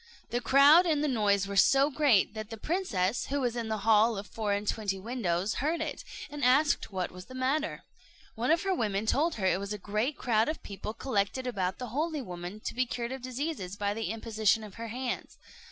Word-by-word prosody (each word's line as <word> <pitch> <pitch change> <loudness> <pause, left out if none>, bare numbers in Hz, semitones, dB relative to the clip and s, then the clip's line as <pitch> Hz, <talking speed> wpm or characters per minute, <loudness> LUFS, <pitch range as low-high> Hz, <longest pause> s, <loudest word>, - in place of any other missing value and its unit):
The 240 - 0
crowd 285 +8 +6
and 300 -3 +1
the - - +2
noise 205 -6 +2
were 200 0 -5
so 275 +9 +5
great 265 -10 +3
that 215 -1 -6
the 225 - -7
princess, 225 - -1
who 285 +1 -1
was 245 -3 -1
in 235 -2 -3
the 220 0 -1
hall 220 0 +4
of 200 - -5
four 210 +2 -3
and 205 +1 -1
twenty 200 -3 -1
windows, 200 -3 -1
heard 320 +4 0
it, 310 -2 -4 0.3
and 290 -1 -5
asked 275 +2 +3
what 185 -2 -3
was 180 0 -10
the 255 - -11
matter. 275 +5 -1 0.5
One 240 +3 -2
of 325 +2 +3
her 385 -1 +1
women 210 - -1
told 310 +8 +1
her 195 - -3
it 185 - +2
was 200 +1 -4
a - - -4
great 215 +8 -2
crowd 225 -1 +2
of 315 - -4
people 205 +2 -6
collected 255 +1 -1
about 190 -7 -2
the 250 -2 -6
holy 300 +3 -2
woman 180 +1 -7
to - - -4
be 255 0 0
cured 235 0 -4
of 265 0 -5
diseases 255 - -4
by 205 0 -1
the 225 +1 -3
imposition 220 -1 +1
of 210 -2 -10
her 230 0 -6
hands. 250 +2 -4
230 Hz, 220 wpm, -29 LUFS, 205-275 Hz, 0.5 s, crowd